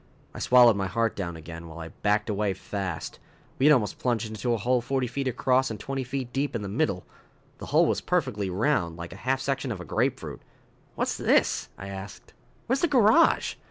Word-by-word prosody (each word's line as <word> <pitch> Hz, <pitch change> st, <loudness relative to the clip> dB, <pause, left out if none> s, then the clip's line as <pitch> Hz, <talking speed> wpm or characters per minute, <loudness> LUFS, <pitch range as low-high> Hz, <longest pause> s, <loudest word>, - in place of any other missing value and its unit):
I -, -, -8 dB
swallowed 125 Hz, -3 st, +6 dB
my 100 Hz, -1 st, -1 dB
heart 115 Hz, +3 st, 0 dB
down 85 Hz, -4 st, -4 dB
again, 80 Hz, +1 st, -9 dB
while 80 Hz, 0 st, -10 dB
I 80 Hz, -1 st, -7 dB
backed 105 Hz, +4 st, 0 dB
away 105 Hz, -2 st, 0 dB
fast. 95 Hz, -4 st, -5 dB, 0.4 s
We 135 Hz, -, +5 dB
had 150 Hz, -, +8 dB
almost 115 Hz, -7 st, 0 dB
plunged 115 Hz, -3 st, -1 dB
into 110 Hz, +3 st, -2 dB
a 115 Hz, -, +2 dB
hole 125 Hz, +4 st, +1 dB
forty 130 Hz, +1 st, -1 dB
feet 130 Hz, +3 st, -3 dB
across 130 Hz, +1 st, +2 dB
and 110 Hz, -3 st, -6 dB
twenty 135 Hz, +4 st, -3 dB
feet 125 Hz, -1 st, -5 dB
deep 140 Hz, -1 st, -1 dB
in 110 Hz, -, -2 dB
the -, -, -4 dB
middle. 100 Hz, -, -1 dB, 0.5 s
The -, -, -7 dB
hole -, -, +4 dB
was -, -, 0 dB
perfectly 100 Hz, -2 st, -1 dB
round, 90 Hz, -, 0 dB
like 85 Hz, +1 st, -7 dB
a 100 Hz, -, -13 dB
half 135 Hz, 0 st, +2 dB
section 135 Hz, -1 st, -2 dB
of 105 Hz, -, -4 dB
a 90 Hz, -, -7 dB
grapefruit. -, -, -2 dB, 0.5 s
"What's -, -, -1 dB
this?" -, -, +2 dB
I 95 Hz, -, -7 dB
asked. 95 Hz, 0 st, -9 dB, 0.3 s
"Where's 265 Hz, +3 st, 0 dB
the 345 Hz, -, +3 dB
garage?" 250 Hz, +2 st, +4 dB
115 Hz, 205 wpm, -27 LUFS, 95-130 Hz, 0.5 s, had